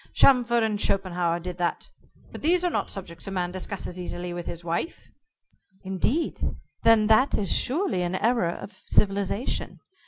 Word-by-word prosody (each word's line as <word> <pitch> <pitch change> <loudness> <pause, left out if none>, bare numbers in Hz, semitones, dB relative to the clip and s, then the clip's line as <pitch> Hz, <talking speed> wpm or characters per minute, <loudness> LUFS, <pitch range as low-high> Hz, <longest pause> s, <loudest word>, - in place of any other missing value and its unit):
Chamfort 240 -3 +5
and 215 -2 0
Schopenhauer 175 -3 +1
did 180 0 -7
that. 175 -1 -1 0.4
But - - -8
these 350 +3 +3
are 355 - +1
not - - -1
subjects 175 -3 -7
a - - -2
man 180 -2 -1
discusses 185 -1 -4
easily 175 0 -4
with 175 0 -6
his 170 0 -6
wife." 170 - -3 0.7
"Indeed? 195 - -1 0.4
Then 225 -2 +5
that 220 +6 +4
is 200 -4 +2
surely 285 - +1
an 175 +1 -1
error 230 -3 +2
of 195 +4 -8
civilization. 200 +3 0
195 Hz, 155 wpm, -26 LUFS, 175-230 Hz, 0.7 s, Chamfort